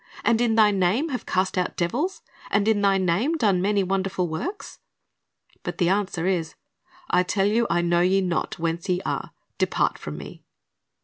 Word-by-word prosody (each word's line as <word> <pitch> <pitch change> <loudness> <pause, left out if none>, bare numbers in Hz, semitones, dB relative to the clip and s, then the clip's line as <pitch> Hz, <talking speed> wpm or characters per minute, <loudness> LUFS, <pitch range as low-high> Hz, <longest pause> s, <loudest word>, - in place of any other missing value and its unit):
and 235 0 +3
in 230 -2 +2
Thy 215 -2 +5
name 200 - +1
have 255 -3 -4
cast 185 0 0
out 180 - -2
devils? 275 - -1 0.3
and 205 +1 +1
in 215 -2 +3
Thy 195 -1 +3
name 190 - +1
done 200 - +2
many 200 +1 +2
wonderful 190 -1 -1
works?" 340 - -5 0.8
But - - -5
the 175 -3 +2
answer 190 -3 0
is, 175 -4 -1 0.6
'T 180 - +5
tell 195 +1 +1
you, 230 +3 +2
I 175 - +1
know 175 0 +2
you 190 +2 +3
not 175 -3 -2
whence 165 +2 -3
ye 180 0 +2
are; - - -3 0.3
depart - - +1
from - - -7
Me.'' - - -10
195 Hz, 180 wpm, -24 LUFS, 180-215 Hz, 0.8 s, Thy